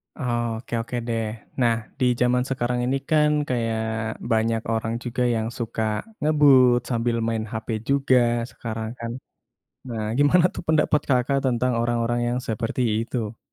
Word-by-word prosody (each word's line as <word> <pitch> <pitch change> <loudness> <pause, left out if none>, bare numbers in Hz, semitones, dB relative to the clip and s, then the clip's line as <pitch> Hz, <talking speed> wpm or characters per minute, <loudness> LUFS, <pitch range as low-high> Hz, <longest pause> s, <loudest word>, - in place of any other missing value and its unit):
Oke 120 -3 -3
oke 115 +2 -6
deh. 115 -1 -1 0.4
Nah, 115 -1 +4 0.2
di 130 - +2 0.2
jaman 125 0 +3
sekarang 125 -2 -1
ini 135 +2 +1
kan 150 -1 +4 0.2
kayak 115 -2 0 0.5
banyak 115 0 +2
orang 110 0 -1
juga 125 0 -3
yang 110 0 -1
suka 115 -2 -3 0.4
ngebut 140 -5 +5
sambil 120 -1 0
main 115 -1 -1
hp 110 -2 -5 0.2
juga 135 -2 +3 0.3
sekarang 110 -1 -5
kan? 115 0 -4 0.8
Nah 115 -3 -3
gimana 165 +5 +5
tuh - - -6
pendapat 150 -2 +3
Kakak 135 +2 +2
tentang 125 0 +1
orang-orang 120 0 0
yang 120 +1 0
seperti 115 +3 -2 0.2
itu? 115 -2 -4
120 Hz, 140 wpm, -24 LUFS, 115-130 Hz, 0.8 s, ngebut